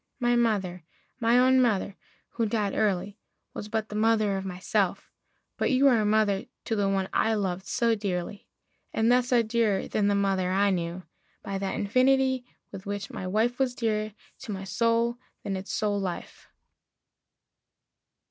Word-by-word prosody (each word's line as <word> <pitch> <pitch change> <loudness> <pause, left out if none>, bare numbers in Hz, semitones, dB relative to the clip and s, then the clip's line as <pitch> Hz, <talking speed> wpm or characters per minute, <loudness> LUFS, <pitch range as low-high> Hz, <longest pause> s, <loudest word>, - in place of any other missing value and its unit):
My 240 -1 +2
mother 195 -7 0 0.4
my 230 0 +3
own 260 +1 +5
mother, 205 -5 +1 0.3
who 230 -2 -1
died 210 -2 -1
early, 200 -1 0 0.3
Was 210 - -6
but 220 0 -2
the 210 - -6
mother 215 -2 +2
of 190 - -3
myself; 190 +1 -1 0.5
but - - +1
you 270 +1 +4
Are 230 -4 +3
mother 210 -2 +2 0.2
to 225 - -1
the 200 -2 +1
one 195 -1 0
I 220 0 +2
loved 190 -2 -2
so 235 -2 +2
dearly, 200 -1 -4 0.4
And 225 +2 +2
thus 250 0 +2
are 240 -2 +4
dearer 220 -3 0
than 205 -2 +1
the 205 - +2
mother 195 -2 +1
I 200 +1 +3
knew 175 0 -3 0.4
By 195 -1 -3
that 195 -1 -2
infinity 260 +3 +2 0.3
with 195 0 -9
which 205 0 -4
my 185 - -5
wife 225 +6 0
Was 255 -2 +1
dearer 215 -3 -1 0.3
to 220 - -7
my 195 -1 -5
soul 230 +5 +1 0.2
than 195 - -2
its 190 +1 -6
soul 205 -1 0
life. 185 -3 -6
210 Hz, 165 wpm, -27 LUFS, 195-230 Hz, 0.5 s, own